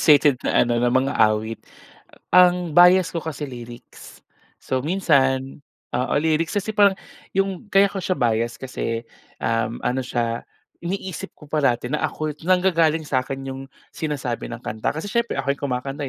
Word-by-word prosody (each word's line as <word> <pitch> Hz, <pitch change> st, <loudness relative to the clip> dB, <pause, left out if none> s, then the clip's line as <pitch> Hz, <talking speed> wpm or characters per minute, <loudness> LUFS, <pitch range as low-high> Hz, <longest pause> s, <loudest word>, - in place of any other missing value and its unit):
frustrated 145 Hz, -4 st, +5 dB
na -, -, +2 dB
ano 120 Hz, -1 st, 0 dB
na 120 Hz, -, +3 dB
mang-aawit 110 Hz, -4 st, +1 dB, 0.7 s
ang 180 Hz, -3 st, +4 dB
bias 180 Hz, 0 st, +7 dB
ko -, -, -5 dB
kasi 145 Hz, -3 st, -5 dB
lyrics. 120 Hz, -1 st, -11 dB, 0.4 s
So, 130 Hz, +1 st, -2 dB
minsan 140 Hz, -6 st, +1 dB, 0.3 s
oo, 125 Hz, +1 st, -1 dB
lyrics 160 Hz, +1 st, +1 dB
kasi 205 Hz, +1 st, -1 dB
parang 200 Hz, -1 st, +6 dB, 0.4 s
yung 195 Hz, 0 st, -1 dB
kaya 195 Hz, 0 st, +6 dB
ko 195 Hz, -, -7 dB
siya 185 Hz, 0 st, 0 dB
bias 115 Hz, -2 st, 0 dB
kasi, 115 Hz, -3 st, -3 dB, 0.4 s
um, 115 Hz, 0 st, -1 dB
ano 130 Hz, +2 st, 0 dB
siya 115 Hz, -1 st, -2 dB, 0.4 s
iniisip 185 Hz, +1 st, -5 dB
ko 150 Hz, -, -14 dB
parati 135 Hz, -4 st, 0 dB
na 150 Hz, -, 0 dB
ako 155 Hz, -1 st, -2 dB
nanggagaling 165 Hz, -3 st, +2 dB
sa 130 Hz, -3 st, +1 dB
akin 135 Hz, +1 st, -5 dB, 0.2 s
yung 135 Hz, -, -7 dB, 0.3 s
sinasabi 135 Hz, -8 st, -3 dB
ng 120 Hz, -, -5 dB
kanta 110 Hz, 0 st, -2 dB
kasi 155 Hz, +5 st, -4 dB
siyempre 235 Hz, +3 st, -1 dB
ako 140 Hz, -, 0 dB
yung 140 Hz, -, -17 dB
kumakanta, 135 Hz, +3 st, -3 dB
145 Hz, 155 wpm, -22 LUFS, 125-175 Hz, 0.7 s, bias